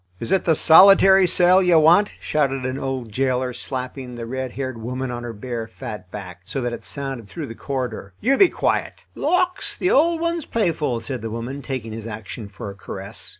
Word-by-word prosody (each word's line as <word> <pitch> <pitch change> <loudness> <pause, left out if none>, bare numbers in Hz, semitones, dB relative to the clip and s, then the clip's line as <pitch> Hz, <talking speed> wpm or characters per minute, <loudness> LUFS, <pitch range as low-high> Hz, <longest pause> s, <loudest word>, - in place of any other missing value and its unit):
"Is 115 - -3
it 190 -2 +2
the 160 - +4
solitary 190 +3 +7
cell 180 +2 +4
you 180 -3 +4
want?" 170 +7 +5
shouted 135 -4 -1
an 130 +1 -3
old 130 -4 -4
jailer, 130 +1 0
slapping 130 0 -6
the 120 -1 -6
red 130 +1 -4
haired 130 -3 -4
woman 125 +2 -4
on 120 0 -5
her 120 -1 -5
bare, 115 +1 -5
fat 110 -5 -8
back, 90 -3 -9
so 105 +8 -4
that 120 -2 -2
it - - -7
sounded 135 -6 -5
through 100 - -6
the 115 - -8
corridor. 125 -6 -4
"You 265 +5 +2
be 375 +4 +6
quiet." - - -1 0.2
"Lawks! 365 0 0
the 360 - +1
old 330 +3 +3
one's 335 -1 -1
playful," 160 - 0
said 125 +1 -5
the 115 - -4
woman, 120 +5 -5
taking 125 -4 -5
his 110 0 -7
action 110 0 -7
for 100 +1 -7
a - - -10
caress. 100 0 -3
130 Hz, 200 wpm, -22 LUFS, 115-165 Hz, 0.2 s, solitary